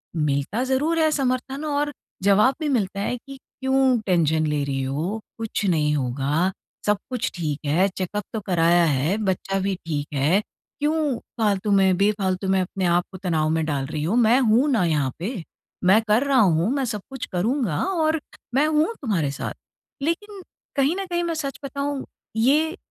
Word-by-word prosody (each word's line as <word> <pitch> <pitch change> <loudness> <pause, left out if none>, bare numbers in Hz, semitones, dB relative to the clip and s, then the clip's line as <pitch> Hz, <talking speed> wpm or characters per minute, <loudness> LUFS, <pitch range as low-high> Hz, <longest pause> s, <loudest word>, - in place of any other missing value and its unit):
मिलता 150 - 0
ज़रूर 290 +6 +1
है 315 - +4
समर्थन 265 0 -1
और 290 0 0 0.3
जवाब 210 +7 +4
भी 310 - -1
मिलता 200 -7 0
है 225 - -1
कि 275 +2 -11
क्यों 265 -2 +1
टेंशन 160 -4 +2
ले 150 -1 0
रही 135 -1 -2
हो? 155 +11 -2 0.2
कुछ 225 -2 -3
नहीं 150 -5 +2
होगा। 140 +7 0 0.3
सब 210 0 +3
कुछ 250 -1 -2
ठीक 155 -4 -2
है, 170 +7 +3
चेकअप 190 +2 -4
तो 220 - -1
कराया 175 -2 +4
है। 150 +7 +1
बच्चा 195 -1 -1
भी 195 0 -1
ठीक 145 -3 -2
है। 150 +8 +3 0.4
क्यों 300 -3 +1 0.2
फालतू 205 -1 +1
में 190 -2 +4
बेफालतू 195 -2 +1
में 190 - +3
अपने 185 +1 -2
आप 175 0 +3
को 185 - -8
तनाव 155 -3 +1
में 160 0 +1
डाल 140 -3 -1
रही 150 0 -3
हो? 175 +8 0
मैं 240 +1 +5
हूँ 245 +4 +4
ना 225 -8 +3
यहाँ 145 -5 +1
पे। 195 0 -4 0.4
मैं 190 +5 +6
कर 215 +5 +4
रहा 275 -2 +3
हूँ, 180 0 +3
मैं 275 -2 0
सब 215 -4 -3
कुछ 265 -2 -5
करूँगा 210 - 0
और 320 -4 +1 0.3
मैं 285 - +4
हूँ 310 +1 +3
तुम्हारे 170 - 0
साथ। 140 - -4 0.5
लेकिन 385 +7 -3 0.3
कहीं 280 +4 +2
न 390 0 -3
कहीं, 345 -1 -1
मैं 335 - -1
सच 285 -4 -4
बताऊँ, 280 0 -3 0.3
ये 300 - +2
205 Hz, 180 wpm, -23 LUFS, 165-270 Hz, 0.5 s, मैं